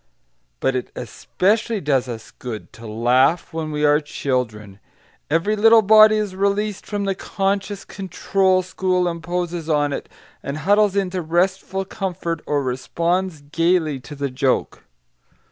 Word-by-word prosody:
But 135 - 0
it 125 - -3
especially 205 - -1
does 140 -6 +1
us 110 -2 -7
good 115 -4 -8
to 115 0 -11
laugh 125 +11 +2
when 160 -1 -3
we 150 0 0
are 150 0 +5
children. 110 -9 -3 0.5
Every 165 +8 +1
little 225 +1 +6
body 215 +1 +7
is 210 -3 -2
released 200 +1 -1
from 205 -1 -2
the 195 -1 0
conscious 195 +1 -2
control 190 0 0
school 185 0 0
imposes 175 0 -3
on 145 -2 +2
it, - - -5 0.3
and 140 +2 -4
huddles 205 +3 +3
into 190 -2 -1
restful 185 +3 0
comfort 175 -4 -4
or 145 -1 0
responds 170 +6 -1
gaily 160 0 +1
to 125 +4 -10
the 140 -1 -3
joke. 130 0 -1
170 Hz, 140 wpm, -21 LUFS, 140-195 Hz, 0.5 s, body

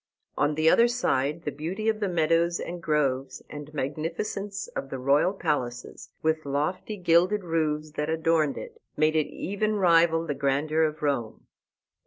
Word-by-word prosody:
On 145 +1 +1
the 155 +1 +1
other 230 +8 +6
side 165 - 0
the 150 - -2
beauty 175 +10 -4
of 220 -1 +1
the 205 -2 -1
meadows 170 0 +2
and 175 0 -6
groves, 135 -4 -1
and 145 0 -8
magnificence 165 - -3
of - - -5
the - - -4
royal 140 +7 +3
palaces, 145 -10 -3
with 160 0 +1
lofty 150 +9 -2
gilded 180 +3 +3
roofs 155 -2 -1
that 150 0 -3
adorned 160 -2 +1
it, 460 -1 -9 0.2
made 155 +1 +3
it 155 -2 +2
even 215 +3 -2
rival 165 -3 +4
the 150 - -2
grandeur 145 +3 0
of 155 -1 0
Rome. 135 -7 -2
160 Hz, 160 wpm, -27 LUFS, 145-180 Hz, 0.2 s, other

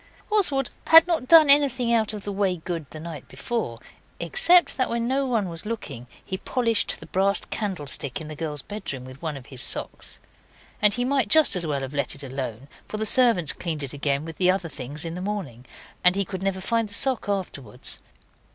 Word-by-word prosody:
Oswald 295 - +3 0.2
had 325 0 +9
not 330 -8 -1
done 320 -1 +8
anything 265 -4 +6
out 220 -2 +2
of 210 -2 -7
the 205 - -4
way 195 -2 0
good 165 -3 -6
the 155 - -10
night 155 -4 -8
before, 135 - -4 0.4
except 360 -8 +4
that 255 - 0
when 235 0 -1
no 270 +2 0
one 225 -6 0
was 165 -2 -6
looking 210 - -6 0.2
he 190 - -5
polished 230 -4 0
the - - -11
brass 195 +1 +1
candlestick 145 - -3
in 160 - -8
the 155 - -8
girls' 150 -3 -4
bedroom 140 -11 -6
with 130 +1 -12
one 155 -4 -4
of 130 - -12
his 130 -3 -4
socks. - - -2 0.6
And 210 0 +5
he 245 0 -1
might 265 -4 +1
just 315 +3 +5
as 175 -3 -3
well 140 -2 -2
have 135 +1 -6
let 140 -2 -2
it 140 - -10
alone, 130 -2 -6 0.2
for 215 - -5
the 220 - -2
servants 220 - +3
cleaned 160 -4 -5
it 135 - -6
again 140 +1 -1
with 165 -2 -9
the 185 -1 +2
other 185 -2 0
things 145 +3 -7
in 165 - -5
the 180 - -6
morning, 180 - -5 0.4
and 180 +1 +6
he 200 0 -1
could 190 0 -6
never 190 -1 -2
find 230 +2 -1
the 205 - -4
sock 260 -6 -1
afterwards. 175 - -5
190 Hz, 210 wpm, -24 LUFS, 145-235 Hz, 0.6 s, had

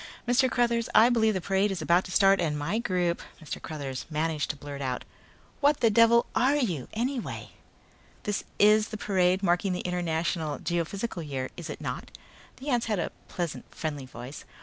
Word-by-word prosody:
"Mr. 255 +2 +4
Cruthers, 235 -1 +1
I 230 +2 +8
believe 220 -3 +3
the 185 - -1
parade 195 +3 +2
is 190 -2 -3
about 170 +3 +3
to 180 - -8
start 195 0 +5
and 150 -3 0
my 170 +10 -1
group 180 -6 0
" - - -25
Mr. 155 - -6
Cruthers 140 -4 -5
managed 155 -1 -1
to - - -2
blurt 140 0 -7
out. 130 -2 -2 0.5
"What 290 0 +3
the 230 - +5
devil 230 +2 +6
are 260 +5 +3
you 180 - -1
anyway!" 245 +3 -3 0.7
"This 205 -1 -1
is 210 +1 +5
the 215 - -6
parade 190 -2 +2
marking 180 +1 +2
the 180 - -2
International 170 -3 -1
Geophysical 175 +4 -2
Year, 135 -4 -4
is 170 -2 -7
it - - -6
not?" - - -4 0.5
The 275 +3 -6
ant 245 -3 +2
had 215 -2 0
a 170 - -2 0.2
pleasant, 175 -4 -4
friendly 145 -4 -4
voice. 125 +2 -9
180 Hz, 185 wpm, -28 LUFS, 155-225 Hz, 0.7 s, I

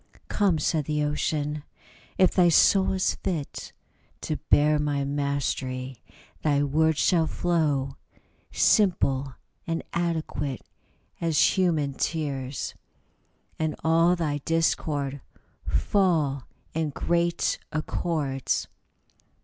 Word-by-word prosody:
" - - -27
Come," 195 -5 +2
said 155 0 0
the 150 0 0
Ocean, 150 0 -1 0.3
" - - -27
if 185 - +5
thy 180 -2 +4
soul 190 +4 +4
is 190 -1 +1
fit 160 -6 -4 0.5
To - - -2
bear 150 +1 +4
my 145 -2 0
mastery, 135 -3 -2 0.4
thy 145 -2 +2
words 160 +2 +2
shall 165 -2 +3
flow 150 -6 0 0.5
Simple 140 - +2 0.3
and 165 0 -2
adequate 160 - -2 0.6
as 165 -3 +1 0.2
human 160 -7 +1
tears, 140 -4 -3 0.9
And 155 -1 -1
all 165 +2 +4
thy 150 -4 -1
discord 145 -3 -1 0.5
fall 150 - +1 0.3
in 160 -1 -1
great 170 +3 0
accords." 155 -4 -2
150 Hz, 100 wpm, -26 LUFS, 140-170 Hz, 0.9 s, if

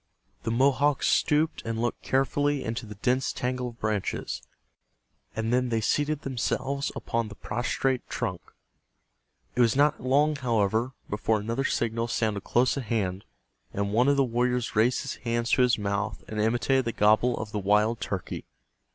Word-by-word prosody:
The 115 - -3
Mohawks 140 +3 +3
stooped 155 +2 +2
and 115 0 -3
looked 120 +1 -1
carefully 140 +2 +1
into 115 0 -4
the 105 - -8
dense 125 +6 0
tangle 125 0 -2
of 120 -1 -10
branches, 105 -3 -2 0.9
and 110 +1 -1
then 125 0 +2
they 115 -1 +1
seated 145 +6 0
themselves 135 +2 -1
upon 115 -1 -2
the 105 - -10
prostrate 120 +4 -1
trunk. 90 -2 -3 1.1
It 125 - +3
was 115 -1 +4
not 145 +2 +3
long, 145 +4 +2
however, 115 -1 +1
before 105 +1 0
another 115 +6 -2
signal 115 -1 0
sounded 110 -3 -1
close 125 +3 +2
at 135 - -3
hand, 100 -4 -2 0.5
and 100 0 -2
one 120 +4 +4
of 140 0 +4
the 140 - +5
warriors 125 -1 0
raised 115 +4 +3
his - - -5
hands 120 0 -1
to - - +4
his 125 -1 +4
mouth 100 0 -2
and 105 -1 -2
imitated 120 +4 +2
the 115 - -2
gobble 110 +4 +3
of 110 -1 -5
the 105 - -2
wild 105 +4 +2
turkey. 95 -3 -4
120 Hz, 165 wpm, -27 LUFS, 110-130 Hz, 1.1 s, the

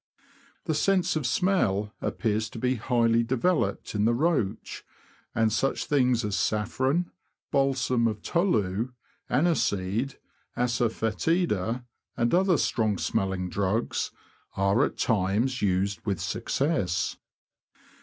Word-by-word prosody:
The 160 - 0
sense 185 +3 +2
of 150 -5 0
smell 110 - +1
appears 110 -1 -1
to - - -10
be 125 +3 +1
highly 115 -1 +2
developed 120 - 0
in 105 0 +1
the 120 +1 +3
roach, 150 - -1 0.5
and 110 -1 +2
such 135 +4 0
things 125 -5 +2
as 105 -2 -1
saffron, 130 +12 0 0.4
balsam 130 -3 +2
of 105 -2 -4
tolu, 115 - 0 0.4
aniseed, 125 - 0 0.4
assafoetida, 120 - 0 0.3
and 120 0 +1
other 185 -1 +4
strong 110 -6 +1
smelling 95 -1 -1
drugs, 100 +5 -1 0.5
are 100 +6 +3
at - - -2
times 110 +5 +1
used 95 -1 0
with 100 -5 -1
success. 105 - -1
115 Hz, 110 wpm, -27 LUFS, 105-135 Hz, 0.5 s, other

